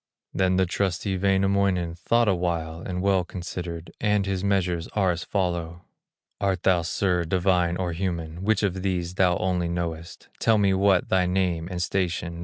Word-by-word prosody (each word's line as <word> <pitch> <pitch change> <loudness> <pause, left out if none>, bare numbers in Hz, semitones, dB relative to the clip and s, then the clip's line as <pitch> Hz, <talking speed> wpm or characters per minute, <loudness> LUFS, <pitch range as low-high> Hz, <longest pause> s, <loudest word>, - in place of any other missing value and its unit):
Then 95 0 +2
the 95 0 +3
trusty 95 +1 -1
Wainamoinen 95 -2 +1
Thought 115 +7 +1
awhile 85 -3 -1
and 90 0 -4
well 95 -2 +3
considered, 85 -1 -6
And 105 -2 +2
his 95 -1 -2
measures 90 -4 0
are 95 -3 +2
as 85 0 -3
follow: 85 -3 -2 0.6
"Art 95 -2 0
thou, 90 -2 +4
sir, 90 +1 0
divine 90 0 +1
or 90 -2 -2
human? 85 -2 -3
Which 110 +1 +2
of 95 -2 0
these 90 -2 -2
thou 90 -2 +3
only 90 -2 0
knowest; 85 -1 -5
Tell 115 -1 +3
me 100 -2 +3
what 95 -1 +3
thy 90 -1 +3
name 90 -3 0
and 90 -2 -2
station. 85 -2 -2
90 Hz, 165 wpm, -25 LUFS, 85-95 Hz, 0.6 s, thou